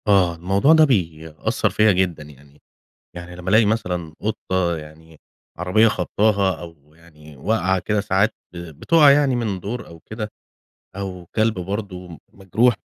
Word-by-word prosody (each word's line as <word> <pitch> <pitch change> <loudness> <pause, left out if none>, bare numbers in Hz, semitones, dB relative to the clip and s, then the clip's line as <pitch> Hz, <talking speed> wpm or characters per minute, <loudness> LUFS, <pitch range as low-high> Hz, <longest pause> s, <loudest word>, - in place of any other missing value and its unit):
آه، 95 -4 +3
الموضوع 95 - +3
ده 160 -1 +6
بيأثر 80 - -1
فيا 110 0 +3
جدًا 90 -4 0
يعني، 70 0 -18 0.5
يعني 90 0 -9
لمّا 90 +1 -5
ألاقي 110 +3 +5
مثلًا 90 -7 -2
قطة 95 -5 -1
يعني 80 0 -13 0.4
عربيّة 95 +6 +3
خبطاها، 100 -2 0
أو 80 -3 -13
يعني 75 -3 -17
واقعة 95 +4 0
كده 105 +3 -1
ساعات 100 +1 +1 0.2
بتقع 85 - +3
يعني 140 -2 +3
من 105 -6 -2
دور 115 +6 -5
أو 85 -1 -14
كده، 110 +4 -7 0.6
أو 95 -3 -6
كلب 110 0 +2
برضه 90 -3 -6
مجروح 110 +6 +1
95 Hz, 140 wpm, -21 LUFS, 85-110 Hz, 0.6 s, ده